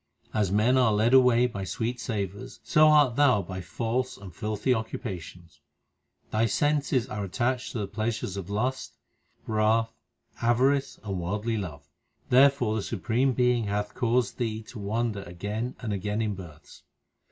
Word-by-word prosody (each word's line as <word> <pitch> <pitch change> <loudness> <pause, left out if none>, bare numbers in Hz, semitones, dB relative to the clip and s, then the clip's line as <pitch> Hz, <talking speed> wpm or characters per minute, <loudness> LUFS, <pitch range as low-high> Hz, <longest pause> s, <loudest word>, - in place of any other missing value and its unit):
As 105 -4 +1
men 115 +6 +3
are 125 -3 +4
led 110 +4 +2
away 125 -2 +6
by 110 -6 -3
sweet 115 +6 -3
savours, 100 -4 -4
so 155 0 +5
art 145 -5 +5
thou 130 -9 +4
by 95 +1 -6
false 120 +8 -2
and 95 -3 -11
filthy 105 +6 0
occupations. 95 -7 -6 0.7
Thy 110 +1 +2
senses 140 0 +1
are 105 -1 -4
attached 120 +6 -1
to - - -3
the 105 -2 -2
pleasures 110 -1 -3
of 100 -1 -6
lust, 125 +6 -2 0.5
wrath, 110 +1 +1 0.5
avarice, 130 +4 +2
and 100 -3 -3
worldly 105 +6 -2
love; 75 -8 -6 0.4
Therefore 130 -3 +5
the - - -1
Supreme 115 +7 0
Being 125 -2 +2
hath 105 +1 -2
caused 120 -1 0
thee 110 -2 -2
to 120 - -9
wander 105 +1 -2
again 105 +7 -4
and 110 -4 -2
again 105 +2 -2
in 105 -1 -1
births. 85 -6 -12
110 Hz, 150 wpm, -27 LUFS, 100-125 Hz, 0.7 s, away